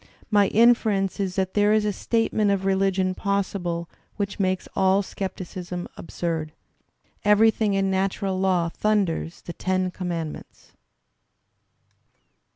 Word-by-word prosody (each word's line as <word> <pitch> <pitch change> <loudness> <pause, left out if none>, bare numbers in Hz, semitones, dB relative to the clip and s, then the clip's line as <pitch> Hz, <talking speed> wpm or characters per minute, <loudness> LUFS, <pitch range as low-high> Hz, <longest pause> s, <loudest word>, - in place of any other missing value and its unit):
My 205 -2 +5
inference 215 -4 +3
is 190 -2 -2
that 190 -1 -1
there 205 0 +3
is 215 -1 +2
a 210 - 0
statement 220 -1 +1
of 200 -1 +1
reUgion 190 -1 +1
possible 185 -4 -2 0.3
which 200 -1 -3
makes 185 -1 0
all 190 +1 +3
scepticism 180 -2 -6
absurd." 165 -3 -4 0.7
"Everything 210 0 +4
in 195 0 +1
natural 190 0 -1
law 185 -3 +2
thunders 190 -4 -1
the 170 - -7
Ten 185 0 -1
Commandments." 170 -4 -6
190 Hz, 115 wpm, -24 LUFS, 185-205 Hz, 0.7 s, My